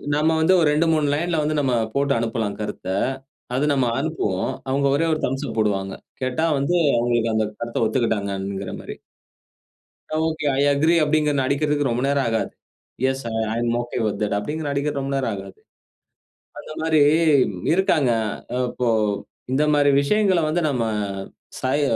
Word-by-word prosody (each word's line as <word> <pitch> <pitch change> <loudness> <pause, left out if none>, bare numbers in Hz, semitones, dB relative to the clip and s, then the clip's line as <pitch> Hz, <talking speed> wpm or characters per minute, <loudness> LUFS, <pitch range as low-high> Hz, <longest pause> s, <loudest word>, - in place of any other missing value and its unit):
நம்ம 155 +2 +2
வந்து 170 +4 +4
ஒரு 160 - +3
2, 150 +3 +2
3 155 -2 +1
லைன்ல 165 +2 0
வந்து 155 +1 0
நம்ம 135 -3 +1 0.2
போட்டு 140 0 +1
அனுப்பலாம் 115 -2 -2
கருத்த. 105 -3 -5 0.7
அது 140 +3 +1
நம்ம 135 -2 +2
அனுப்புவோம். 135 - -1 0.2
அவுங்க 140 +1 +2
ஒரே 165 - +1
ஒரு 155 - -1
தம்ப்ஸ் 135 +3 -2
அப் 115 - -6
போடுவாங்க. 95 -2 0 0.3
கேட்டா 130 +6 0
வந்து 140 +6 0 0.2
அவுங்களுக்கு 120 -1 +1
அந்த 110 -1 +2 0.2
கருத்த 120 0 -1
ஒத்துக்கிட்டாங்கங்கிறமாரி. 100 -4 -2 1.3
ஒகே. 160 -1 -3
ஐ - - +3
அக்ரி 160 +4 +3
அப்பிடிங்கிற 150 0 +2
நான் 130 - +1
அடிக்கிறக்கு 145 0 +1
ரொம்ப 120 +1 -1
நேரம் 140 -1 +1
ஆகாது. 115 0 -1 0.6
எஸ் 135 0 -6 0.3
ஐ - - -3
ஆம் 120 0 0
ஒகே 120 +1 -6
வித் 105 -2 -2
தட் 105 -1 0
அப்பிடிங்கிற 150 +8 -4
நான் 140 - -1
அடிக்க 145 +1 0
ரொம்ப 135 0 -3
நேரம் 130 -4 0
ஆகாது. 95 -1 -10 1.0
அந்தமாரி 160 0 -1 0.7
இருக்காங்க. 155 -8 +2 0.4
அ - - 0
இப்போ 125 -1 -1 0.6
இந்தமாரி 145 +1 +3
விஷயங்கள 195 +3 +2
வந்து 165 +3 0
நம்ம 125 -4 0 0.8
சய 135 +3 0
140 Hz, 155 wpm, -22 LUFS, 115-150 Hz, 1.3 s, வந்து